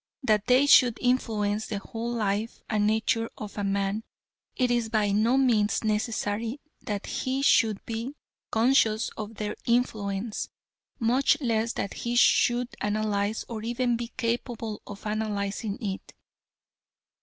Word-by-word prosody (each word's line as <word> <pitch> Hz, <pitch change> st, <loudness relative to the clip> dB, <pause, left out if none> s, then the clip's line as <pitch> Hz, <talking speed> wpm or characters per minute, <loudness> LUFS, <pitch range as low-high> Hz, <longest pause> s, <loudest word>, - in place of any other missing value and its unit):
That 215 Hz, -3 st, +2 dB
they 255 Hz, +2 st, +5 dB
should 250 Hz, -4 st, +6 dB
influence 220 Hz, -4 st, 0 dB
the 210 Hz, -, -3 dB
whole 230 Hz, +4 st, -5 dB
life 215 Hz, -1 st, -1 dB
and 210 Hz, -2 st, +1 dB
nature 220 Hz, +1 st, +1 dB
of 210 Hz, -2 st, -7 dB
a 205 Hz, -, -3 dB
man 200 Hz, +1 st, 0 dB, 0.5 s
it 250 Hz, -2 st, +1 dB
is 235 Hz, -2 st, +1 dB
by 215 Hz, -2 st, +1 dB
no 225 Hz, +6 st, +3 dB
means 230 Hz, -6 st, +2 dB
necessary 220 Hz, +2 st, -1 dB, 0.2 s
that 205 Hz, -1 st, -4 dB
he 265 Hz, +1 st, -2 dB
should 220 Hz, -7 st, +3 dB
be 230 Hz, +5 st, -4 dB, 0.3 s
conscious 225 Hz, -2 st, +3 dB
of 215 Hz, +1 st, -7 dB
their 210 Hz, 0 st, -3 dB
influence, 220 Hz, -3 st, -1 dB, 0.5 s
much 255 Hz, +5 st, +3 dB
less 230 Hz, -4 st, 0 dB
that 200 Hz, -, -3 dB
he 240 Hz, 0 st, -3 dB
should 240 Hz, 0 st, +4 dB
analyse 210 Hz, 0 st, -1 dB
or 225 Hz, -2 st, -5 dB
even 240 Hz, +2 st, 0 dB
be 235 Hz, 0 st, -4 dB
capable 230 Hz, -2 st, -2 dB
of 205 Hz, +1 st, -9 dB
analysing 210 Hz, -1 st, -2 dB
it. 200 Hz, -5 st, -5 dB
220 Hz, 135 wpm, -27 LUFS, 210-240 Hz, 0.5 s, should